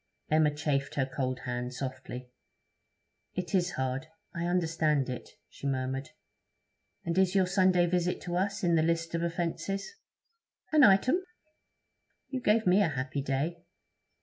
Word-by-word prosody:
Emma 155 -1 +5
chafed 145 -2 -1
her 135 - +2
cold 130 -1 -3
hand 125 0 -4
softly. 130 -1 -6 1.0
'It 180 +2 -4
is 180 -2 +2
hard; 130 +3 -2 0.3
I 170 0 -2
understand 160 -5 +1
it,' 125 - -7
she 140 - -7
murmured. 135 0 -2 1.0
'And 170 -1 -1
is 190 0 +3
your 190 -1 +5
Sunday 185 -1 +4
visit 180 0 0
to 175 - -4
us 200 +2 -1
in 175 -1 +3
the 165 - +4
list 165 +1 0
of 170 - 0
offences?' 175 - -2 0.8
'An 305 -2 +6
item.' 255 - +5 1.1
'You 260 -1 -2
gave 220 0 +3
me 185 +3 +5
a 200 - +4
happy 135 0 -3
day.' 145 +5 -2
165 Hz, 145 wpm, -30 LUFS, 135-180 Hz, 1.1 s, An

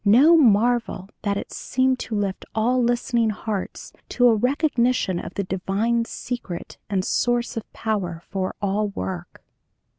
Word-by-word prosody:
no 255 +11 +7
marvel 235 - +3
that 200 -1 0
it - - -6
seemed 260 0 +1
to 225 - -4
lift 200 -2 -2
all 245 +3 +2
listening 240 -1 +1
hearts 210 -2 -4 0.2
to 245 - +4
a 235 - +6
recognition 250 - +1
of 175 - -8
the 200 - -1
divine 195 +5 0
secret 230 -7 -6
and 190 -2 0
source 240 0 0
of 225 - -6
power 195 -7 -2
for 190 -1 -3
all 205 +2 +1
work. 185 -3 -6
220 Hz, 145 wpm, -23 LUFS, 195-245 Hz, 0.2 s, no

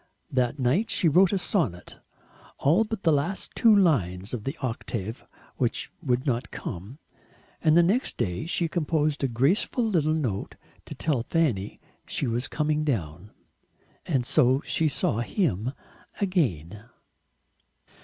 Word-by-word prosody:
That 125 +1 0
night 140 - +1
she 180 - +3
wrote 180 +4 +5
a 200 - +1
sonnet, 140 - -1 0.6
all 165 +10 +3
but 220 -2 -5
the 165 - +4
last 145 +7 -1
two 225 -2 +5
lines 105 - +1
of 110 -4 -4
the 135 +4 -3
octave 115 -3 -4 0.3
which - - -1
would 125 +2 0
not 125 -4 -1
come, 100 +7 -7 0.7
and 155 0 +5
the 175 - +7
next 210 +10 +1
day 90 - -2
she 170 0 0
composed 155 -3 0
a - - +3
graceful 140 - +1
little 160 -7 +1
note 120 -11 -3 0.3
to - - -8
tell 145 -7 0
Fanny 120 - -1 0.3
she - - -1
was 120 +1 -1
coming 150 0 0
down. 90 - -3 0.8
And 135 -7 +1
so 130 +2 +3
she 160 - +1
saw 125 -6 0
him 120 - -1 0.5
again. 105 - -1
140 Hz, 140 wpm, -26 LUFS, 115-170 Hz, 0.8 s, the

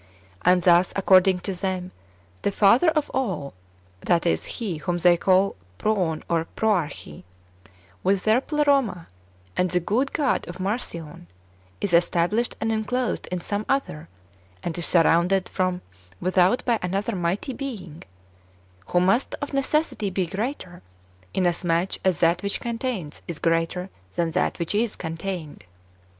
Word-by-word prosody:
And 180 0 +4
thus, 175 0 +5
according 190 -1 +4
to 195 - -3
them, 185 -1 -3 0.5
the - - 0
Father 230 - +5
of 305 -2 -1
all 185 - -2 0.5
(that 170 - +1
is. 170 - +1
He 200 -9 -3
whom 175 +3 -2
they 175 0 +5
call 190 +3 +3 0.2
Proon 180 - 0
and 165 -1 -1
Proarche), 170 - -1 0.8
with 195 +1 +1
their 220 +4 +3
Pleroma, 275 - +1 0.5
and 180 - +1
the 180 +1 +1
good 235 +10 0
God 295 -4 0
of 175 +2 -8
Marcion, 180 - -4 0.5
is 200 -4 -2
established 175 +7 +2
and 225 0 0
enclosed 230 +3 -1
in 180 -1 -3
some 205 +4 -2
other, 170 - -1 0.5
and 165 - -3
is 175 - 0
surrounded 175 +2 +3
from 185 -1 -1 0.4
without 185 +5 +2
by 235 -3 +2
another 195 +5 -1
mighty 180 +8 -1
Being, 200 - -7 0.9
who 175 - +2
must 195 +8 +2
of 285 - -5
necessity 275 -6 0
be 185 -1 -1
greater, 190 - -5 0.5
inasmuch 175 0 0
as 185 -4 +1
that 170 +1 +4
wdiich 200 +2 -3
contains 230 - -4
is 170 - -5
greater 165 +3 0 0.2
than 170 -1 0
that - - 0
which 170 +1 -2
is 220 +1 0
contained. 165 -1 -5
185 Hz, 140 wpm, -24 LUFS, 170-220 Hz, 0.9 s, thus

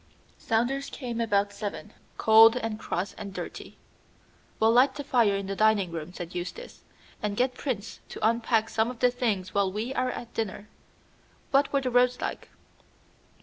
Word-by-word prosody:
Saunders 245 +5 0
came 240 -4 -4
about 200 -2 +1
seven, 210 0 -6 0.2
cold 225 +2 +7
and 225 -3 -3
cross 185 -1 -3
and 200 -2 -7
dirty. - - -7 0.8
"We'll 220 +1 +4
light 260 +3 +4
the 290 - -5
fire 235 -7 +3
in 195 0 -3
the 195 +1 -4
dining 210 -4 +3
room," 165 0 -6
said 175 -1 -8
Eustace, 180 - -7 0.4
"and 210 -1 -2
get 250 0 +2
Prince 240 -6 -4
to - - 0
unpack 225 -1 +1
some 220 +1 +1
of 250 - -7
the 250 +1 +3
things 215 -7 -2
while 200 -2 +1
we 220 +6 -3
are 255 -1 0
at 240 -2 -7
dinner. 210 -2 -4 0.8
What 275 +1 +3
were 280 - +2
the 255 -1 -2
roads 250 0 +3
like?" - - -5
225 Hz, 170 wpm, -27 LUFS, 200-250 Hz, 0.8 s, cold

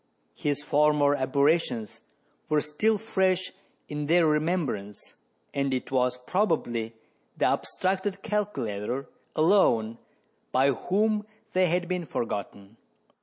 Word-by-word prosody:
His 145 - -2
former 150 -1 +3
aberrations 140 -4 +1 0.5
were 155 -1 +3
still 210 +10 +1
fresh 190 -3 0 0.4
in 150 0 -4
their 170 +1 +4
remembrance, 150 - -1 0.4
and 140 -1 0
it 130 - -5
was 125 -1 +1
probably 120 - 0 0.4
the - - +2
abstracted 190 +1 -1
calculator 135 - -2 0.3
alone 120 - +3 0.5
by 135 +2 +4
whom 210 - 0 0.3
they 185 0 +4
had 175 +1 0
been 180 -1 -2
forgotten. 100 -4 -5
150 Hz, 105 wpm, -27 LUFS, 125-185 Hz, 0.5 s, their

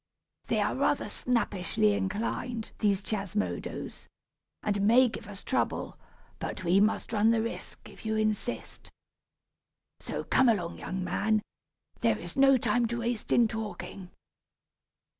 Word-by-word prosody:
They - - +1
are - - +1
rather - - +1
snappishly 215 -3 +1
inclined, 220 +4 -2
these 200 -2 +2
Chiasmodos, 210 -1 -3 0.6
and 205 -1 0
may 235 +5 +6
give - - -8
us 200 -1 -9
trouble; 260 - -1 0.4
but - - -4
we 180 +2 +4
must 215 +2 +1
run 215 +1 +4
the 225 -1 +3
risk, 230 - -6
if - - -14
you 220 0 -1
insist. 215 +2 -2 1.1
So, - - -4
come 260 -2 +4
along, 175 -6 0
young 190 0 -3
man, 215 +3 +1 0.6
there's - - 0
no 270 -1 +6
time 245 0 +2
to 235 +1 -3
waste 235 -1 -2
in 235 -1 +5
talking." 210 -4 -6
215 Hz, 130 wpm, -29 LUFS, 200-235 Hz, 1.1 s, may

